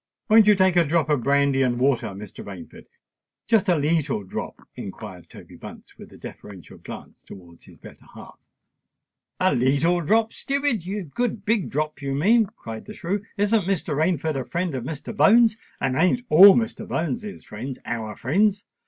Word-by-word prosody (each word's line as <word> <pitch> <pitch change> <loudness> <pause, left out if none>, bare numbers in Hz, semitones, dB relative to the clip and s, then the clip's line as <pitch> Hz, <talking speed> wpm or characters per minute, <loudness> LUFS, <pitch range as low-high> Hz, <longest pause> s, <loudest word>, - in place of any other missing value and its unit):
"Won't 215 -1 +6
you 210 - +6
take 190 -2 +2
a 175 - +6
drop 155 0 0
of 145 -4 +1
brandy 140 +1 +2
and 125 -2 +1
water, 125 -2 +1
Mr. 100 0 -9
Rainford—just 185 - -5
a 180 - +4
leetle 150 -6 0
drop?" 95 - -7
inquired 95 -2 -9
Toby - - -14
Bunce, - - -12
with - - -14
a - - -14
deferential 95 -4 -12
glance - - -11
towards 85 -3 -15
his - - -17
better - - -15
half.. - - -13 1.0
"A - - +2
leetle 140 +8 +2
drop, 220 +7 +1
stupid!—a 225 - -2
good 205 - -3
big 215 -3 0
drop, 150 +1 -3
you 135 -1 -3
mean!" 215 +9 +3
cried 115 - -10
the 215 - -10
shrew. 195 +4 -3
"Isn't 205 -1 +1
Mr. 190 -6 -1
Rainford 155 -1 0
a - - -5
friend 175 +4 -3
of 125 -2 -4
Mr. 160 - -6
Bones?—and 215 - +2
ain't 180 - +2
all 190 +5 +9
Mr. 225 -2 -2
Bones's 170 +6 -4
friends 125 +5 -7
our 110 -2 -4
friends? 200 - +1
160 Hz, 165 wpm, -23 LUFS, 130-205 Hz, 1.0 s, all